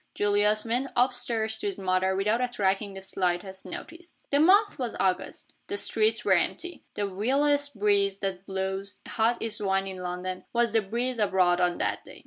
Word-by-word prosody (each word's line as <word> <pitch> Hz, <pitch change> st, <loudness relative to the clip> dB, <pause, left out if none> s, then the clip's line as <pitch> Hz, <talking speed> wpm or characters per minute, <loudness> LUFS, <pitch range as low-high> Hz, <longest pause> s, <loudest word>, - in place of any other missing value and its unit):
Julius 205 Hz, +1 st, +2 dB
went 245 Hz, +4 st, -1 dB
up 250 Hz, +1 st, +3 dB
stairs 225 Hz, -3 st, -2 dB
to 410 Hz, -, -2 dB
his 395 Hz, -, -3 dB
mother 190 Hz, 0 st, +1 dB
without 210 Hz, +5 st, +1 dB
attracting 200 Hz, -4 st, 0 dB
the 190 Hz, -, -8 dB
slightest 190 Hz, 0 st, -2 dB
notice. 335 Hz, -, -9 dB, 0.2 s
The 285 Hz, -, +4 dB
month 400 Hz, +5 st, +5 dB
was 245 Hz, -3 st, -3 dB
August. 185 Hz, -1 st, -1 dB
The 405 Hz, -, -3 dB
streets 220 Hz, -, +1 dB
were 195 Hz, -, +5 dB
empty. 335 Hz, -, -1 dB
The 205 Hz, -, -1 dB
vilest 275 Hz, +6 st, +1 dB
breeze 200 Hz, -1 st, +3 dB
that 195 Hz, -1 st, -4 dB
blows 190 Hz, +1 st, -4 dB
a -, -, -10 dB
hot 230 Hz, +2 st, +1 dB
east 225 Hz, -2 st, -3 dB
wind 195 Hz, -1 st, +1 dB
in 190 Hz, -1 st, -6 dB
London 180 Hz, 0 st, -5 dB
was 235 Hz, -2 st, +2 dB
the 225 Hz, -, +4 dB
breeze 235 Hz, +4 st, -2 dB
abroad 185 Hz, -3 st, +3 dB
on 175 Hz, -1 st, +2 dB
that -, -, -2 dB
day. -, -, -12 dB
205 Hz, 185 wpm, -27 LUFS, 190-240 Hz, 0.2 s, month